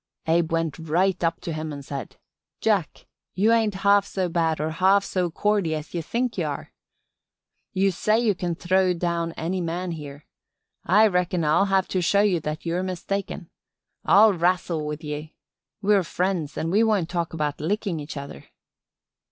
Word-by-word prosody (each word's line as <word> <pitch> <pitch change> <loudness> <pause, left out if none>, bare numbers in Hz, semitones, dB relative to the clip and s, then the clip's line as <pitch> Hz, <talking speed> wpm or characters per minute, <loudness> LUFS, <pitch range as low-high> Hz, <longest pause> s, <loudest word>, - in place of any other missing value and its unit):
Abe 165 0 +2
went 165 -1 -1
right 175 +4 0
up 165 0 0
to 165 - -4
him 155 0 -4
an' 140 -1 -7
said: 135 -4 -7 0.4
"'Jack, - - 0 0.3
you 210 +5 +3
ain't 220 -3 +2
half 200 0 +6
so 190 -2 -2
bad 165 -2 0
or 155 +1 -1
half 190 +4 +3
so 180 -2 -1
cordy 195 -2 0
as 155 0 -7
ye 170 - -2
think 240 +8 -2
ye - - +1
are. - - -5 1.0
You 195 0 +2
say 215 +5 +1
you 230 -3 +2
can 175 -2 -3
throw 185 +1 +2
down 170 -1 -1
any 180 +3 -2
man 175 +2 -3
here. 145 -2 -8 0.6
I 210 +4 +5
reckon 180 -3 +1
I'll 160 +6 +4
have 195 -1 +1
to 185 - 0
show 200 +4 +3
ye 200 -5 +2
that 155 +1 -5
you're 170 +2 -1
mistaken. 185 -1 -4 0.5
I'll 210 +1 +6
rassle 175 -3 0
with 150 +2 -5
ye. 150 +1 -6 0.5
We're 205 0 +4
friends 175 -3 -2
an' 165 - -2
we 210 +4 +4
won't 210 -7 +2
talk 170 -2 -3
about 150 -2 -2
lickin' 190 0 -1
each 150 0 -7
other. 140 - -8
175 Hz, 175 wpm, -24 LUFS, 160-195 Hz, 1.0 s, half